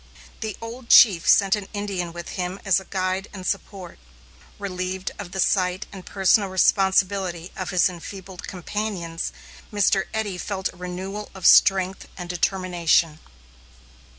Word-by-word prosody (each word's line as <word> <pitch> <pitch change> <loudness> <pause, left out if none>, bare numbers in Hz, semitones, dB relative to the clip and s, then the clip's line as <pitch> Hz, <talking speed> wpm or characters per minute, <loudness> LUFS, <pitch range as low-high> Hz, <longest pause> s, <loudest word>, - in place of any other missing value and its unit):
The 220 -3 -5
old 235 +2 -8
chief 185 -7 +7
sent 195 0 +5
an 205 -2 -6
Indian 195 -4 -3
with 170 0 -8
him 180 +1 -4
as 195 -1 +4
a 190 - -13
guide 185 +1 -2
and 190 -2 -8
support. 185 -1 -4 0.6
Relieved 185 -1 -4
of 190 -4 -7
the 190 - -5
sight 185 +1 +1
and 190 -2 -9
personal 195 +1 +2
responsibility 190 -2 +1
of 185 - -4
his 185 -2 +3
enfeebled 185 +1 -9
companions, 180 -3 -4 0.4
Mr. 200 -2 +2
Eddy 205 -4 -3
felt 190 -1 -3
a - - -18
renewal 185 +3 -6
of 190 -2 -7
strength 190 -1 +5
and 180 -2 -6
determination. 175 -3 +1
190 Hz, 140 wpm, -23 LUFS, 180-200 Hz, 0.6 s, chief